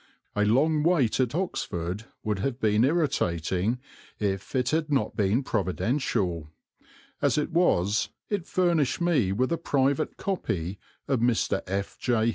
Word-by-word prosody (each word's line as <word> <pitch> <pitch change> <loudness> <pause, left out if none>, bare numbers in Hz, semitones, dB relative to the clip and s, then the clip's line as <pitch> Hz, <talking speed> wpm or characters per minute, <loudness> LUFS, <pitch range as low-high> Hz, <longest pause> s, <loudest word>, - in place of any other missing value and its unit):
A 105 - +2
long 150 +8 +3
wait 150 -9 +2
at 125 +1 +1
Oxford 100 - -3 0.2
would 105 -3 -1
have 125 +4 -2
been 110 -1 +3
irritating 110 - +1 0.4
if 100 +3 -2
it 125 -1 +2
had 155 -1 0
not 130 -7 +1
been 105 +6 +2
providential; 95 - -1 0.7
as - - +2
it 150 +2 0
was 110 - +2 0.2
it 200 -5 -2
furnished 170 -7 +1
me 165 - +2
with 125 +8 0
a 170 - 0
private 140 -1 +1
copy 95 - -2 0.3
of 135 -3 +1
Mr. 115 -4 +1
F. 95 +1 -3
J. 115 -2 +2
120 Hz, 140 wpm, -27 LUFS, 100-150 Hz, 0.7 s, long